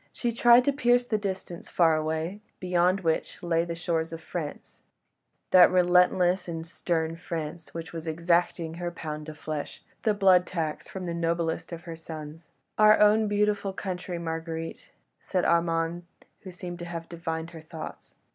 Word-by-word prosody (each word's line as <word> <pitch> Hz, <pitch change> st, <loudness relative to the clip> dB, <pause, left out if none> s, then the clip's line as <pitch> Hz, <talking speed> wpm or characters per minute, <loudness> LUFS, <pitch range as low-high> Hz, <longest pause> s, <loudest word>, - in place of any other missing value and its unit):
She 240 Hz, -, -2 dB
tried 240 Hz, +1 st, +6 dB
to 285 Hz, -, +3 dB
pierce 245 Hz, -3 st, +3 dB
the 215 Hz, -3 st, 0 dB
distance 190 Hz, -4 st, -5 dB
far 165 Hz, -2 st, +4 dB
away, 160 Hz, +5 st, -2 dB, 0.2 s
beyond 180 Hz, +1 st, +2 dB
which 165 Hz, 0 st, -1 dB
lay 165 Hz, -1 st, +2 dB
the 170 Hz, -1 st, -4 dB
shores 165 Hz, -1 st, -1 dB
of 165 Hz, -, -6 dB
France: 160 Hz, -2 st, -7 dB, 0.7 s
that 180 Hz, -1 st, +8 dB
relentless 180 Hz, 0 st, +3 dB
and 165 Hz, -1 st, -4 dB
stern 165 Hz, -1 st, -2 dB
France 165 Hz, -1 st, -6 dB
which 165 Hz, 0 st, -6 dB
was 165 Hz, 0 st, -6 dB
exacting 170 Hz, 0 st, +1 dB
her 175 Hz, 0 st, -2 dB
pound 155 Hz, -2 st, -6 dB
of 155 Hz, -, -9 dB
flesh, 155 Hz, -1 st, -5 dB, 0.2 s
the 215 Hz, -2 st, +2 dB
blood 190 Hz, -2 st, +5 dB
tax 160 Hz, -4 st, -3 dB
from 190 Hz, -1 st, -6 dB
the 170 Hz, -, -3 dB
noblest 170 Hz, 0 st, -1 dB
of 170 Hz, 0 st, -7 dB
her 165 Hz, -1 st, -7 dB
sons. 160 Hz, 0 st, -9 dB, 0.3 s
"Our 215 Hz, 0 st, +7 dB
own 210 Hz, +1 st, +5 dB
beautiful 205 Hz, -1 st, +1 dB
country, 185 Hz, -2 st, -4 dB
Marguerite," 165 Hz, 0 st, -5 dB, 0.3 s
said 185 Hz, -2 st, -1 dB
Armand, 170 Hz, 0 st, +1 dB, 0.3 s
who 190 Hz, -, -10 dB
seemed 175 Hz, 0 st, -7 dB
to 175 Hz, -, -5 dB
have 165 Hz, -1 st, -6 dB
divined 165 Hz, -1 st, -4 dB
her 165 Hz, -2 st, -10 dB
thoughts. 160 Hz, 0 st, -9 dB
170 Hz, 165 wpm, -27 LUFS, 165-185 Hz, 0.7 s, that